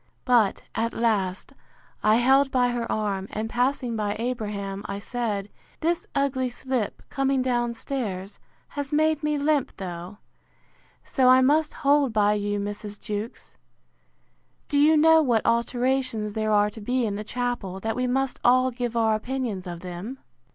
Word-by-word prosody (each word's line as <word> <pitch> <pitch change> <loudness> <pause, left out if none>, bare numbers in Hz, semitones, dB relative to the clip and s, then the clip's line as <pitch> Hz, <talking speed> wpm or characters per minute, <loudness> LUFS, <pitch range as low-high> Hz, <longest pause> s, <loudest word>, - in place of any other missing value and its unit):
But, 235 -6 +3
at 230 +1 -1
last, 200 -5 0 0.5
I 215 +1 +4
held 265 +3 +4
by 250 -2 +2
her 240 -1 -2
arm, 200 -3 -1
and 215 +1 -3
passing 245 0 0
by 210 -1 -1
Abraham, 210 -4 -3
I 200 - -4
said, 210 -2 -3 0.3
This 335 +1 0
ugly 265 -2 +1
slip, 245 -3 -3
coming 270 -1 +1
down 240 -2 0
stairs, 210 -7 -4 0.3
has 285 0 -5
made 310 0 +2
me 300 -1 0
limp, 290 -1 0
though; 180 +1 -7 0.9
so 255 -2 +3
I 255 0 +7
must 300 +4 +3
hold 280 -3 +4
by 210 -1 +3
you, 205 0 -1
Mrs. 205 0 -5
Jewkes. 210 +1 -6 1.1
Do 285 - +2
you 310 +2 +6
know 320 +1 +6
what 240 -7 +1
alterations 235 -2 0
there 215 0 -1
are 210 0 +3
to 220 - -10
be 245 +3 0
in 210 - -1
the 205 +1 -4
chapel, 240 -5 -3
that 225 +2 -2
we 250 0 0
must 265 +1 -1
all 255 +1 +4
give 240 -1 -3
our 220 -1 +3
opinions 215 -4 -3
of 175 -1 -6
them? 185 +8 -6
240 Hz, 160 wpm, -25 LUFS, 210-265 Hz, 1.1 s, I